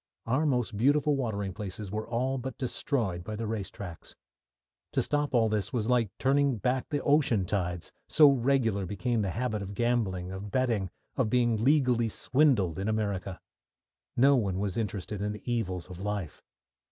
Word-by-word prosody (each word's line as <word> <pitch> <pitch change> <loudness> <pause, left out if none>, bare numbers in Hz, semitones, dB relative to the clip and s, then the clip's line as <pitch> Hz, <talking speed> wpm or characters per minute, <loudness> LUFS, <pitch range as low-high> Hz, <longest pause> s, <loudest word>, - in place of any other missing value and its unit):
Our 130 +7 +1
most 125 -6 0
beautiful 145 +6 +3
watering 100 -7 -2
places 100 0 -5
were 110 +1 -3
all 130 +3 0
but 130 0 -6
destroyed 115 -8 -1
by 110 +4 -5
the 115 +2 -4
race 105 -4 -3
tracks. 90 -5 -9 0.8
To - - +2
stop 145 -2 0
all 115 -2 +4
this 105 -3 -1
was 115 -3 -1
like 120 -4 +3
turning 140 -1 +2
back 125 +5 -1
the 145 -2 -1
ocean 140 -9 +3
tides, 90 -3 -2 0.2
so 150 -1 +7
regular 120 -7 +1
became 110 +4 -1
the 100 - -1
habit 110 +1 -2
of 100 0 -6
gambling, 105 -7 0
of 95 +2 -6
betting, 115 -5 0 0.3
of 125 -5 +2
being 120 -2 +2
legally 125 -5 +3
swindled 115 - +2
in 100 - -2
America. 100 -4 -2 0.8
No 140 +3 +6
one 100 -7 0
was 100 -1 -2
interested 105 -2 -3
in 105 +1 -1
the 105 - -10
evils 95 -7 -2
of 90 -1 -9
life. 100 -5 -4
110 Hz, 170 wpm, -29 LUFS, 100-130 Hz, 0.8 s, so